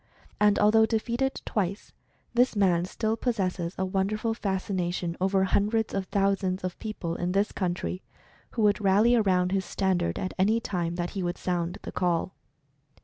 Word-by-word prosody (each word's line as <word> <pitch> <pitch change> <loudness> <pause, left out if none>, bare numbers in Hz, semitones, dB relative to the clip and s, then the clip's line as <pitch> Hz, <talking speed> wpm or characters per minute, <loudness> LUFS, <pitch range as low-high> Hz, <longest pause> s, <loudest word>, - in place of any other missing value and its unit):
And 210 -1 +4
although 220 +1 +5
defeated 235 +4 -1
twice, 200 0 -2 0.4
this 245 0 +3
man 180 -4 +3
still 220 +4 -1
possesses 190 -7 -2
a 190 - 0
wonderful 205 +4 -1
fascination 185 -4 -2
over 190 0 +2
hundreds 210 +3 +1
of 195 -1 -1
thousands 195 -1 0
of 185 -1 -4
people 210 -6 -4
in 175 +1 -2
this 200 +2 +1
country, 180 0 -2 0.5
who 225 - 0
would 210 0 +3
rally 205 +4 +4
around 185 -5 +2
his 195 -1 +1
standard 190 -3 0
at 185 - -3
any 215 +4 +3
time 175 -6 -2
that 175 0 -3
he 195 - -4
would 175 0 -2
sound 175 -1 -2
the - - -6
call. 180 0 0
195 Hz, 160 wpm, -27 LUFS, 180-215 Hz, 0.5 s, although